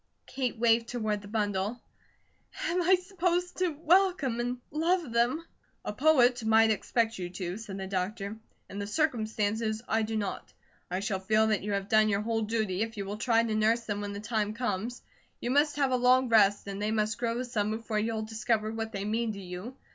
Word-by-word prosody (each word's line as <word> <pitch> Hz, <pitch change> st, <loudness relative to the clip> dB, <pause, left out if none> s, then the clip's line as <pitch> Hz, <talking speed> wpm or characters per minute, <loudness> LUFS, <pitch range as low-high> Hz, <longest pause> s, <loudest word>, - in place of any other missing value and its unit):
Kate 255 Hz, -3 st, -3 dB
waved 230 Hz, 0 st, +3 dB
toward 215 Hz, -4 st, -1 dB
the 205 Hz, -, -11 dB
bundle: 205 Hz, +1 st, -1 dB, 0.8 s
"Am 355 Hz, +2 st, +1 dB
I 365 Hz, +2 st, +5 dB
supposed 360 Hz, -1 st, -1 dB
to 370 Hz, -1 st, +2 dB
welcome 330 Hz, -4 st, +2 dB
and 245 Hz, +1 st, -1 dB
love 325 Hz, -1 st, +1 dB
them?" 240 Hz, +8 st, +1 dB, 0.4 s
"A -, -, -3 dB
poet 250 Hz, -2 st, +4 dB
might 220 Hz, 0 st, +5 dB
expect 225 Hz, +1 st, 0 dB
you 175 Hz, -1 st, -4 dB
to," 180 Hz, 0 st, -4 dB
said 215 Hz, -3 st, -7 dB
the 190 Hz, -, -4 dB
doctor. 195 Hz, +2 st, -3 dB, 0.3 s
"In 200 Hz, -, -7 dB
the 200 Hz, -, -3 dB
circumstances, 220 Hz, -4 st, 0 dB
I 220 Hz, +1 st, +1 dB
do 220 Hz, 0 st, -2 dB
not. 205 Hz, -2 st, -4 dB, 0.4 s
I 180 Hz, +2 st, -2 dB
shall 200 Hz, -2 st, -1 dB
feel 215 Hz, +3 st, +3 dB
that 215 Hz, -1 st, +1 dB
you 205 Hz, +1 st, -3 dB
have 200 Hz, 0 st, -2 dB
done 215 Hz, 0 st, +4 dB
your 200 Hz, 0 st, +1 dB
whole 225 Hz, +1 st, -1 dB
duty 215 Hz, -3 st, -1 dB
if 225 Hz, 0 st, -3 dB
you 200 Hz, -, -3 dB
will 205 Hz, +2 st, -5 dB
try 230 Hz, -1 st, +3 dB
to 225 Hz, -2 st, -1 dB
nurse 220 Hz, +2 st, +2 dB
them 205 Hz, -2 st, -4 dB
when 205 Hz, 0 st, -4 dB
the 200 Hz, -, -5 dB
time 215 Hz, -1 st, -1 dB
comes. 240 Hz, 0 st, -3 dB, 0.4 s
You 240 Hz, -, -2 dB
must 290 Hz, +2 st, +3 dB
have 275 Hz, -2 st, +1 dB
a 255 Hz, -, +3 dB
long 250 Hz, +1 st, +4 dB
rest, 205 Hz, -3 st, +4 dB
and 200 Hz, 0 st, -5 dB
they 210 Hz, -, 0 dB
must 215 Hz, 0 st, 0 dB
grow 235 Hz, +1 st, -1 dB
some 220 Hz, -4 st, -1 dB
before 220 Hz, 0 st, -2 dB
you'll 220 Hz, 0 st, -1 dB
discover 220 Hz, 0 st, -1 dB
what 225 Hz, 0 st, -4 dB
they 195 Hz, 0 st, -3 dB
mean 220 Hz, +1 st, -1 dB
to 200 Hz, -, -8 dB
you. 185 Hz, +7 st, -7 dB
220 Hz, 205 wpm, -29 LUFS, 210-245 Hz, 0.8 s, I